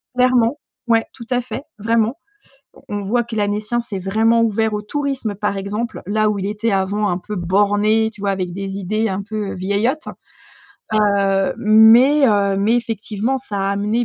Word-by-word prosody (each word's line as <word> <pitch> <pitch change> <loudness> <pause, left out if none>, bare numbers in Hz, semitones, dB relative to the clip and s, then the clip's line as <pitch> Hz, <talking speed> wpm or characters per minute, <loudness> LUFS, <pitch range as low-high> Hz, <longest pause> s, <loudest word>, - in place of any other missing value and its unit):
Clairement. 250 +1 +3 0.3
Ouais, 225 -1 +3
tout 235 - -11
à 250 0 +2
fait 255 +2 -7 0.2
vraiment. 225 +2 +1 0.8
On 205 -1 -3
voit 240 +5 +1
que 235 -1 -8
l'Annécien 210 +2 -1
s'est 220 -5 -5
vraiment 220 +5 +2
ouvert 220 -1 +1
au 210 - -2
tourisme 265 -2 -3
par 205 0 -2
exemple. 210 +5 -4
Là 215 +1 +1
où 205 -1 -2
il 195 - -2
était 210 +2 -1
avant 200 +2 0
un 175 0 -1
peu 210 +3 -7
borné, 205 +4 +2
tu 215 -3 -15
vois? 200 -1 0
Avec 185 -2 -3
des 195 +1 -5
idées 215 +3 -1
un 190 +1 -2
peu, 210 0 -4
heu, - - -5
vieillottes. 205 - -1 0.9
Heu, 200 -2 +2
mais 230 +7 +6
heu, 200 -2 +2
mais 210 +4 +2
effectivement 225 +1 -2
ça 230 -6 -7
a 195 0 0
amené 210 +4 0
210 Hz, 180 wpm, -19 LUFS, 200-230 Hz, 0.9 s, mais